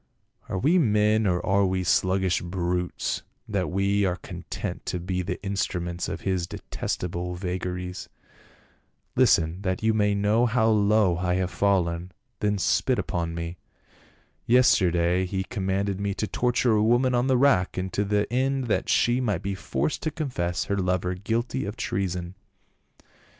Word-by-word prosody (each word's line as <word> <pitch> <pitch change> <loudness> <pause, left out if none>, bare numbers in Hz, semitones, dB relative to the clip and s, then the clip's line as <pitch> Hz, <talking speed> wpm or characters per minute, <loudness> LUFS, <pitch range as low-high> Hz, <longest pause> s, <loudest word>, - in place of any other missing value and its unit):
"Are 95 - -2
we 160 - +3
men 105 -4 +3
or 90 -1 0
are 100 +1 +3
we 95 -1 0
sluggish 95 0 +2
brutes 90 0 -2 0.3
that 100 -4 -1
we 100 +2 +1
are 90 -2 +1
content 90 - -6
to 90 - -2
be 90 +1 -2
the 90 0 -4
instruments 90 -3 -2
of - - -5
his 95 -3 -1
detest - - -4
able 90 0 -3
vagaries? 90 0 -4 1.1
Listen, 85 +3 +3
that 95 0 -2
you 110 0 +3
may 105 -1 +2
know 105 +4 +2
how 115 -1 +2
low 105 -4 +3
I 90 0 0
have 95 -1 -1
fallen, 90 -3 0 0.3
then 105 0 +1
spit 95 - +1
upon 85 -1 -2
me. 85 +1 -5 0.9
Yesterday 90 -7 +3
he 95 +1 -2
com 95 -2 -4
manded 100 0 0
me 100 -1 -2
to 110 - -1
torture 125 +2 +1
a 105 -1 +3
woman 120 +3 +3
on 120 +1 +2
the 130 -1 +3
rack, 120 -11 +3
to 100 - 0
the 105 0 +1
end 135 +1 +1
that 115 - -1
she 120 +2 +3
might 105 -5 -1
be 100 +1 -2
forced 75 -6 -2
to 155 - -1
confess 105 - -2
her 100 - -2
lover 90 -1 0
guilty 115 +7 -2
of 100 +3 -5
treason. 90 -2 -2
95 Hz, 160 wpm, -26 LUFS, 90-110 Hz, 1.1 s, we